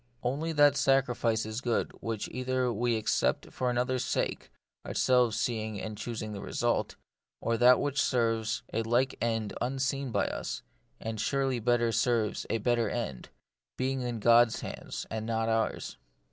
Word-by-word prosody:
Only 145 Hz, +7 st, -1 dB
that 145 Hz, -1 st, +5 dB
sacrifice 125 Hz, -5 st, +2 dB
is 110 Hz, +2 st, -4 dB
good 120 Hz, -2 st, 0 dB
which 115 Hz, -2 st, -3 dB
either 130 Hz, 0 st, -1 dB
we 120 Hz, +1 st, +1 dB
accept 110 Hz, -, 0 dB
for 125 Hz, -, 0 dB
another's 125 Hz, +1 st, 0 dB
sake, -, -, -2 dB, 0.3 s
ourselves 125 Hz, -3 st, +2 dB
seeing 110 Hz, -3 st, -2 dB
and 110 Hz, +1 st, -5 dB
choosing 110 Hz, -1 st, -5 dB
the 100 Hz, -, -6 dB
result; -, -, -1 dB, 0.4 s
or 115 Hz, -, 0 dB
that 125 Hz, +1 st, +6 dB
which 145 Hz, -1 st, 0 dB
serves 115 Hz, -3 st, +1 dB
a 115 Hz, -, +1 dB
like 120 Hz, +4 st, +1 dB
end 115 Hz, -3 st, -1 dB
unseen 135 Hz, +2 st, -1 dB
by -, -, +1 dB
us; -, -, -4 dB, 0.4 s
and 110 Hz, -1 st, -4 dB
surely 135 Hz, 0 st, 0 dB
better 120 Hz, 0 st, +2 dB
serves 115 Hz, -2 st, 0 dB
a 115 Hz, -, +1 dB
better 115 Hz, 0 st, +1 dB
end, 100 Hz, -, -4 dB, 0.5 s
being 130 Hz, +1 st, -1 dB
in 120 Hz, -2 st, -3 dB
God's 115 Hz, +1 st, +5 dB
hands, -, -, -6 dB
and 110 Hz, -1 st, -3 dB
not 115 Hz, 0 st, 0 dB
ours. 115 Hz, 0 st, -1 dB
120 Hz, 155 wpm, -30 LUFS, 110-130 Hz, 0.5 s, that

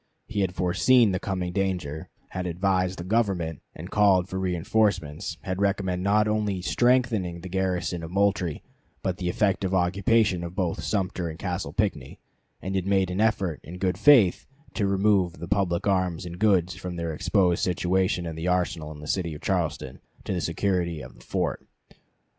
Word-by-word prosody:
He 110 Hz, -4 st, -4 dB
had 95 Hz, -2 st, 0 dB
foreseen 110 Hz, +5 st, +4 dB
the 95 Hz, -, -1 dB
coming 90 Hz, -3 st, -3 dB
danger, 90 Hz, -6 st, -2 dB, 0.2 s
had 90 Hz, -1 st, -4 dB
advised 90 Hz, +1 st, 0 dB
the 85 Hz, -, -5 dB
Government, 95 Hz, -6 st, 0 dB
and 85 Hz, +4 st, -9 dB
called 95 Hz, -3 st, +4 dB
for 95 Hz, 0 st, -4 dB
reënforcements; 90 Hz, -3 st, 0 dB
had 95 Hz, +1 st, -3 dB
recommended 95 Hz, -2 st, 0 dB
not 105 Hz, +2 st, +3 dB
only 105 Hz, -3 st, 0 dB
strengthening 110 Hz, -3 st, +1 dB
the 95 Hz, -, -8 dB
garrison 90 Hz, -2 st, -1 dB
of 80 Hz, -, -6 dB
Moultrie, 95 Hz, -4 st, 0 dB, 0.4 s
but 95 Hz, -2 st, -1 dB
the 90 Hz, -1 st, -2 dB
effective 95 Hz, -1 st, +1 dB
occupation 95 Hz, +1 st, +2 dB
of 85 Hz, +1 st, -6 dB
both 85 Hz, -4 st, -1 dB
Sumter 90 Hz, 0 st, -1 dB
and 80 Hz, -, -7 dB
Castle -, -, -3 dB
Pinckney; -, -, -2 dB, 0.5 s
and 95 Hz, -, -3 dB
had 95 Hz, 0 st, -1 dB
made 95 Hz, -2 st, +2 dB
an 95 Hz, +3 st, -1 dB
effort 100 Hz, -7 st, +1 dB
in 90 Hz, +3 st, -9 dB
good 90 Hz, 0 st, 0 dB
faith 120 Hz, -12 st, +5 dB, 0.3 s
to 100 Hz, -, 0 dB
remove 95 Hz, -2 st, +2 dB
the 85 Hz, -, -8 dB
public 95 Hz, -3 st, 0 dB
arms 90 Hz, -4 st, 0 dB
and 85 Hz, 0 st, -8 dB
goods 95 Hz, -4 st, +3 dB
from 90 Hz, -1 st, -6 dB
their 85 Hz, -1 st, -3 dB
exposed 90 Hz, +2 st, +1 dB
situation 90 Hz, 0 st, +1 dB
in 80 Hz, -1 st, -5 dB
the 80 Hz, +2 st, -4 dB
arsenal 90 Hz, -4 st, 0 dB
in 75 Hz, -1 st, -10 dB
the 75 Hz, -, -9 dB
city 85 Hz, -2 st, -1 dB
of 75 Hz, -, -10 dB
Charleston, 80 Hz, -8 st, -2 dB, 0.2 s
to -, -, -3 dB
the 90 Hz, -, -1 dB
security 85 Hz, -2 st, -1 dB
of -, -, -10 dB
the -, -, -18 dB
fort. -, -, -2 dB
90 Hz, 175 wpm, -26 LUFS, 85-100 Hz, 0.5 s, faith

